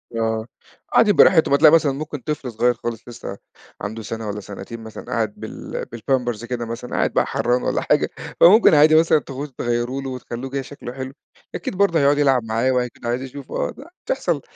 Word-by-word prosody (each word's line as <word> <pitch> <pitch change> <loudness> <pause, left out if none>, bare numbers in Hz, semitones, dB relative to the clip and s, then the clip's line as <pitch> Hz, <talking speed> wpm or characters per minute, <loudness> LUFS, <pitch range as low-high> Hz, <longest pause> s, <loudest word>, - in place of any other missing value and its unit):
آه، 110 -1 -1 0.5
قاعدين 210 -3 +5
براحتهم، 160 -6 +5
هتلاقي 150 +2 +7
مثلًا 155 -4 +4
ممكن 150 +2 -5
طفل 135 -1 -4
صغيّر 120 +2 +2
خالص 120 0 -6
لسه 120 -4 -8 0.4
عَنده 110 +3 -5
سَنة 110 +1 -5
والّا 105 0 -4
سنتين 105 +3 -8
مثلًا، 110 -1 -9
قاعد 110 -3 -1
بال - - -6
بالpampers 120 -2 -1
كده 120 -1 -3
مثلًا، 115 +2 -7
قاعد - - +1
بقى - - +2
حرّان 125 +1 0
والّا - - 0
حاجة، - - +2 0.3
فممكن 200 +2 +7
عادي 155 +1 +6
مثلًا 160 -1 +5
تاخدوه 140 +1 -7
تغيّروا 120 +3 -1
له 135 - -5
وتخلّوه 125 0 -6
كده 140 0 -2
شكْله 130 -2 -9
حلو، 130 0 -6 0.4
أكيد - - -4
برضه 195 -5 +3
هيقعُد 145 0 +4
يلعب 135 -4 +3
معاه 115 +3 0
وهيكون 125 -2 -2
عايز 120 +2 -1
يشوفه 135 +1 -4
أ - - -5
د - - -12 0.2
بتحصَل - - -1
125 Hz, 190 wpm, -21 LUFS, 115-145 Hz, 0.5 s, هتلاقي